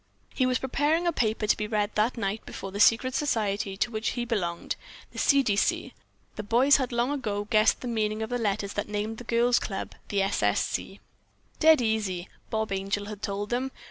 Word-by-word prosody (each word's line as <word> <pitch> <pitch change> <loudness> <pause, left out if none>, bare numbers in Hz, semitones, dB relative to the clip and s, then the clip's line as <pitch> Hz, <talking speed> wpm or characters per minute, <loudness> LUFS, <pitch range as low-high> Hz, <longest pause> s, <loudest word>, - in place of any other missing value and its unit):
He 255 - +2
was 255 -1 +2
preparing 295 +6 +1
a 345 - +3
paper 220 -5 0
to 210 - +3
be 210 - -3
read 210 -1 0
that 220 +4 +1
night 205 0 -2
before 195 - -7
the 200 - -5
secret 235 +4 +4
society 210 -8 -1
to 235 - 0
which 220 0 -2
he 240 - -1
belonged: 180 -8 -2 0.4
The - - -7
C. 280 -1 +4
D. 210 -5 +1
C. 200 - 0 0.4
The - - -2
boys 245 +7 +4
had 260 -3 -2
long 240 +3 +1
ago 210 -8 -2
guessed 215 -1 +4
the 250 - -5
meaning 215 -2 -1
of 220 - -5
the 245 - 0
letters 200 -2 -1
that 205 - -3
named 210 +2 -3
the - - -8
girls' 240 +1 +3
club 195 -2 -5 0.2
"The 200 -1 +1
S. 195 - -1
S. 105 -1 +2
C." 195 - -5 0.6
"Dead 315 -3 +6
easy!" 205 -6 -1 0.2
Bob 220 -1 -2
Angel 195 +1 -2
had 210 -1 -8
told 205 +1 -3
them. 255 +2 0
220 Hz, 210 wpm, -27 LUFS, 205-245 Hz, 0.6 s, Dead